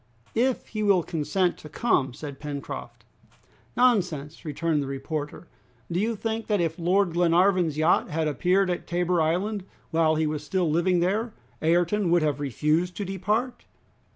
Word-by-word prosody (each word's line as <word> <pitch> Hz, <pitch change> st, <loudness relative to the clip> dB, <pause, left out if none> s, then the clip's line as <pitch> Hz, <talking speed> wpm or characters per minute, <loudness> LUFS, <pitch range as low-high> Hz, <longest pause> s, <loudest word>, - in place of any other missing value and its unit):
"If 250 Hz, +2 st, 0 dB
he 215 Hz, -, -4 dB
will 200 Hz, -4 st, +3 dB
consent 175 Hz, +3 st, -1 dB
to 155 Hz, -, -11 dB
come," 150 Hz, -, +1 dB
said 145 Hz, -2 st, -8 dB
Pencroft. 145 Hz, -2 st, -7 dB, 0.7 s
"Nonsense!" 180 Hz, -, +1 dB
returned 155 Hz, 0 st, -1 dB
the 140 Hz, -, -4 dB
reporter; 145 Hz, +4 st, -5 dB, 0.4 s
"do 170 Hz, -, 0 dB
you 225 Hz, +3 st, 0 dB
think 225 Hz, +1 st, -3 dB
that 210 Hz, -2 st, +1 dB
if 165 Hz, 0 st, -1 dB
Lord 180 Hz, +1 st, +2 dB
Glenarvan's 175 Hz, -1 st, +3 dB
yacht 160 Hz, +3 st, +3 dB
had 160 Hz, 0 st, -1 dB
appeared 180 Hz, +6 st, +2 dB
at 175 Hz, -, -4 dB
Tabor 175 Hz, 0 st, +1 dB
Island, 185 Hz, +6 st, 0 dB, 0.3 s
while 160 Hz, -1 st, +3 dB
he 160 Hz, 0 st, +1 dB
was 150 Hz, -1 st, -2 dB
still 180 Hz, +3 st, 0 dB
living 175 Hz, +3 st, +2 dB
there, 210 Hz, +6 st, 0 dB, 0.3 s
Ayrton 175 Hz, +4 st, +2 dB
would 170 Hz, -1 st, +3 dB
have 150 Hz, -2 st, 0 dB
refused 150 Hz, +6 st, 0 dB
to 205 Hz, -, -3 dB
depart?" 210 Hz, +7 st, -2 dB
175 Hz, 155 wpm, -26 LUFS, 155-195 Hz, 0.7 s, will